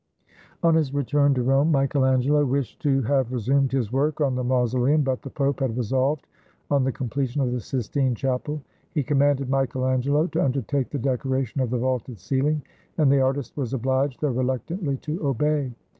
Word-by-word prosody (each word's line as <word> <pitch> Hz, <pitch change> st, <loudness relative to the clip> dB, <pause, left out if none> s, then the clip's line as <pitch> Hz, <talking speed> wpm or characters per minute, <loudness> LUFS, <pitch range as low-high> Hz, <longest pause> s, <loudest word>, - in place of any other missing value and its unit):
On 165 Hz, -1 st, +5 dB
his 150 Hz, -4 st, +1 dB
return 145 Hz, 0 st, +2 dB
to 125 Hz, -, 0 dB
Rome, 135 Hz, +5 st, +3 dB
Michael 135 Hz, -1 st, +2 dB
Angelo 130 Hz, +3 st, +3 dB
wished 135 Hz, -1 st, -2 dB
to 135 Hz, -3 st, +2 dB
have 130 Hz, 0 st, +1 dB
resumed 130 Hz, +3 st, +1 dB
his 125 Hz, -5 st, -1 dB
work 145 Hz, +4 st, 0 dB
on 140 Hz, -3 st, +2 dB
the 125 Hz, 0 st, -2 dB
mausoleum; 125 Hz, +4 st, +2 dB
but 130 Hz, -2 st, -1 dB
the 140 Hz, -, -8 dB
Pope 140 Hz, 0 st, -1 dB
had 130 Hz, -4 st, -1 dB
resolved 130 Hz, +5 st, 0 dB, 0.5 s
on 140 Hz, -2 st, +3 dB
the 135 Hz, -, +1 dB
completion 130 Hz, +2 st, -3 dB
of 130 Hz, -3 st, +1 dB
the 125 Hz, -, -1 dB
Sistine 130 Hz, +2 st, -1 dB
Chapel: 135 Hz, +4 st, -2 dB, 0.3 s
he 150 Hz, -, +1 dB
commanded 140 Hz, -1 st, +2 dB
Michael 130 Hz, -1 st, 0 dB
Angelo 135 Hz, +4 st, +2 dB
to -, -, -1 dB
undertake 135 Hz, 0 st, -1 dB
the 145 Hz, -, -3 dB
decora 130 Hz, +1 st, 0 dB
tion 130 Hz, +4 st, -4 dB
of 125 Hz, -, 0 dB
the 125 Hz, -, 0 dB
vaulted 125 Hz, -1 st, -2 dB
ceiling; 135 Hz, -, 0 dB, 0.3 s
and 150 Hz, -4 st, +4 dB
the 140 Hz, -1 st, +4 dB
artist 130 Hz, -1 st, -1 dB
was 135 Hz, -3 st, -2 dB
obliged, 130 Hz, +2 st, 0 dB
though 150 Hz, -3 st, +1 dB
reluctantly, 130 Hz, -, -2 dB
to 155 Hz, +5 st, -5 dB
obey. 145 Hz, 0 st, 0 dB
135 Hz, 190 wpm, -24 LUFS, 130-145 Hz, 0.5 s, On